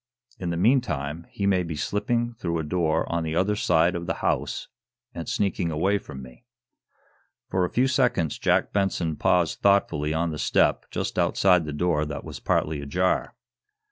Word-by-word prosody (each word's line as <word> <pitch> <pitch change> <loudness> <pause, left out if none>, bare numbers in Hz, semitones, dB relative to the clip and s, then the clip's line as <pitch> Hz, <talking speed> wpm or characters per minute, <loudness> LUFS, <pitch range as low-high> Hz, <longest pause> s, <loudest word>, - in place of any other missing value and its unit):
In 90 - -3
the 85 - -2
meantime, 85 - 0
he 100 - -3
may 95 -2 +3
be 85 -3 -4
slipping 115 +9 -1
through 85 -7 -3
a 80 - -2
door 80 0 0
on 85 - 0
the 80 0 -3
other 95 +4 +2
side 85 -3 +2
of 85 -1 -5
the - - -1
house, - - -2 0.5
and - - -6
sneaking 95 -4 0
away 95 +6 +1
from 65 -8 -10
me." 65 -1 -14 1.1
For 95 -1 +2
a - - -3
few 130 +2 +2
seconds 125 - +1
Jack - - +1
Benson 90 -5 0
paused 85 +2 +1
thoughtfully 85 -7 +2
on 80 +1 0
the 75 - -5
step - - +2
just - - -3
outside 90 -4 +3
the 75 - -4
door 75 0 0
that 75 -2 -5
was - - -8
partly 75 -2 0
ajar. 90 +7 0
85 Hz, 175 wpm, -25 LUFS, 80-100 Hz, 1.1 s, may